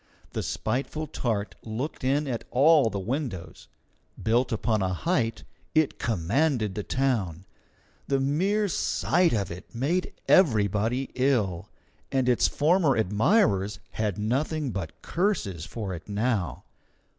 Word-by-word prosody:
The - - -2
spiteful 135 +7 -2
tart 105 -9 -2
looked 120 +8 -4
in 140 +3 +1
at 120 -3 -3
all 145 0 +5
the 100 - -4
windows. 115 - -4 0.5
Built 120 +3 +1
upon 110 -1 0
a 95 -1 0
height, 125 - 0 0.3
it 155 -2 +2
commanded 115 - +1
the 105 - -3
town. 105 -9 -1 0.6
The 135 -1 +1
mere 190 +10 +1
sight 180 -1 +1
of 100 -5 -1
it 90 +6 -10
made 160 +10 0
everybody 115 - +3
ill, 105 -9 0 0.4
and 130 -2 +1
its 125 -2 +4
former 160 -2 +3
admirers 105 - +2
had 105 -3 -2
nothing 135 +6 -1
but 90 -6 -6
curses 135 - -1
for 105 -5 -5
it 85 +3 -9
now. 105 -3 -1
120 Hz, 125 wpm, -27 LUFS, 100-145 Hz, 0.6 s, all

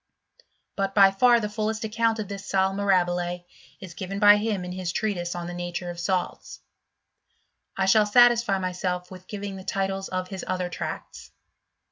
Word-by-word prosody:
But 195 -1 -2
by 195 -2 +7
far 240 +4 +4
the 210 - -2
fullest 215 +1 -3
ac 215 - -6
» - - -8
count 230 -1 +2
of 215 -2 -4
this 200 0 -7
sal 190 0 +1
mirahile 175 -3 0 0.3
is 185 -3 -10
given 190 +3 -5
by 205 0 +7
him 205 -4 -2
in 180 - -6
his 180 -1 -3
trea 215 +1 -1
tise 175 -1 -4
on 175 -1 -5
the 175 - -6
nature 175 0 -4
of 170 - -9
salts. 180 +1 -3 1.2
I 190 - +1
shall 210 +2 +4
satisfy 235 -2 +5
myself 180 -1 -3
with 185 0 -12
giving 200 -2 -6
the 190 - -9
titles 195 0 -2
of 185 0 -4
his 190 -2 -6
other 185 -1 -2
tracts. - - -7
195 Hz, 185 wpm, -25 LUFS, 180-205 Hz, 1.2 s, by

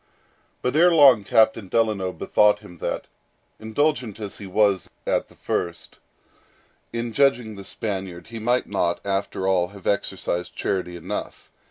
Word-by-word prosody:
But 125 +3 0
ere 175 +3 +6
long 140 -9 +7
Captain 110 -1 +3
Delano 105 -3 +1
bethought 105 +2 +3
him 90 -5 -14
that, - - -3 0.5
indulgent 115 -1 -1
as 105 -2 -7
he 100 - -7
was 100 -1 +2 0.2
at - - 0
the - - -19
first, 85 -1 -4 0.9
in 115 0 -3
judging 125 -5 +2
the 100 -1 -9
Spaniard, 95 -5 -5
he 115 -1 -6
might 120 +3 +1
not, 90 -4 0
after 95 -1 -1
all, 90 -2 +2
have 100 0 -14
exercised 90 -3 -1
charity 90 -3 -2
enough. 85 - -6
105 Hz, 145 wpm, -24 LUFS, 95-115 Hz, 0.9 s, long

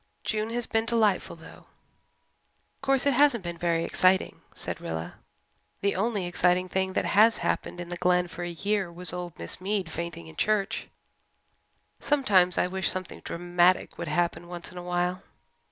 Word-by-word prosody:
June 215 0 -1
has 240 0 -2
been 225 0 0
delightful, 220 -7 +1
though." 165 - -14 1.1
"Of - - -42
course, 270 0 +2
it 280 - +4
hasn't 250 -5 +4
been 170 -1 -5
very 170 -1 +1
exciting," 185 +2 +2
said - - -4
Rilla. 80 0 -5 0.6
"The 200 0 +1
only 205 -1 0
exciting 180 +1 +2
thing 190 0 -1
that - - 0
has 220 +3 +5
happened 175 - -2
in 175 -1 -6
the 175 - -4
Glen 180 0 +2
for 175 0 -8
a 175 - -3
year 195 +2 -1
was 175 -1 -2
old 175 -2 -6
Miss 85 - -5
Mead 190 -3 -1
fainting 170 0 -5
in 160 0 -12
Church. 210 0 0 1.1
Sometimes 200 - +3
I - - +3
wish 190 +1 -1
something 185 -1 -5
dramatic 175 +1 +1
would - - -4
happen 175 0 0
once 175 0 -6
in 180 - -8
a - - -8
while." 180 +1 -1
180 Hz, 170 wpm, -27 LUFS, 175-210 Hz, 1.1 s, has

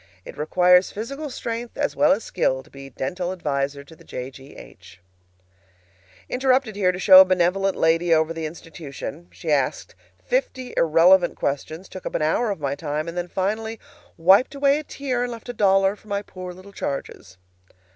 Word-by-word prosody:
It - - -10
requires 180 +4 +3
physical 275 +8 -6
strength 235 -2 -5
as 285 0 -1
well 290 0 +4
as 255 -5 +1
skill 130 0 -1
to - - -22
be 135 0 -11
dental 175 +8 -4
adviser 140 -5 -2
to 160 +3 -16
the - - -18
J. 125 +1 -7
G. 135 +1 -14
H........... - - -14 1.3
Interrupted 260 -4 +1
here 190 -3 +2
to 180 - -6
show 190 0 +9
a - - +7
benevolent 185 +1 +1
lady 165 +1 +2
over 160 0 +3
the 165 -1 -4
institution. 160 -1 -9
She 160 - -5
asked 140 -3 0 0.3
fifty 260 - -2
irrelevant 175 +3 +4
questions, 155 +6 -4
took 185 - -8
up - - -6
an 155 - 0
hour 215 +9 +1
of 200 - -3
my 140 -2 -2
time, 150 +1 -3
then 175 0 -3
finally 220 +5 -3 0.4
wiped 190 - +4
away 280 +1 +3
a - - -7
tear 270 -4 -3
and 245 0 -2
left 230 +1 -9
a - - -3
dollar 195 -2 +3
for 210 - -22
my 200 0 -2
"poor 185 -2 -8
little 185 +3 -14
charges." 105 - -6
180 Hz, 180 wpm, -23 LUFS, 155-220 Hz, 1.3 s, show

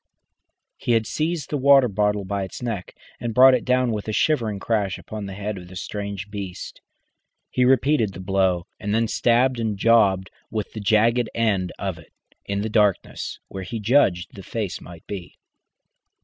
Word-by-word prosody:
He 120 - 0
had 115 -1 +2
seized 155 +2 -2
the 145 - 0
water 135 -1 +6
bottle 105 -1 0
by 100 +1 -2
its 95 +5 -6
neck 110 -7 -4 0.2
and 115 -2 -4
brought 130 +1 +8
it 125 - +1
down 125 -1 +2
with 105 -1 -4
a - - -1
shivering 115 -4 +1
crash 100 -2 -1
upon 105 -2 -7
the 95 - -7
head 105 0 -4
of 90 - -11
the 90 - -12
strange 100 +1 -5
beast. 100 -3 -7 0.7
He 125 - +2
repeated 130 -4 +3
the 90 - -9
blow, 95 -2 +1
and 105 0 -1
then 115 0 +2
stabbed 120 +3 +2
and 110 -3 -1
jabbed 100 -4 +3 0.2
with 110 -2 -4
the 110 - -5
jagged 110 +3 +3
end 100 -6 +1
of 95 -4 -4
it, 80 - -18 0.3
in 100 0 -2
the - - -1
darkness, 105 -3 0
where 95 - -7
he 115 +5 -5
judged 100 -6 +2
the 100 - -9
face 105 -1 -4
might 85 -2 -12
be. 95 -4 -7
105 Hz, 180 wpm, -23 LUFS, 95-120 Hz, 0.7 s, brought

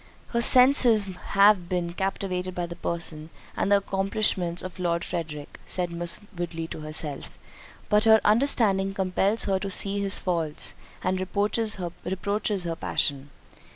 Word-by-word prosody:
"Her 235 - 0
senses 250 -4 +6 0.3
have 200 -3 +5
been 175 -2 -2
captivated 185 -1 -3
by 175 - -2
the 170 0 -8
person 165 -3 -4 0.3
and 200 - -1
accomplishments 195 -3 0
of 185 0 -8
Lord 170 -1 -1
Frederick," 155 -4 -6
said 180 -2 -2
Miss 170 0 -2 0.2
Woodley 170 -1 -4
to - - -7
herself, 155 -2 -3 0.5
"but 210 +2 +3
her 220 0 +7
understanding 210 -5 +2
compels 195 +3 +1
her 195 -1 +1
to 195 0 -4
see 200 +1 0
his 200 0 +3
faults, 165 -4 -2 0.3
and 185 0 0
reproaches 210 +4 0
her 190 0 -2
passion. 140 -3 -1
185 Hz, 135 wpm, -26 LUFS, 170-200 Hz, 0.5 s, her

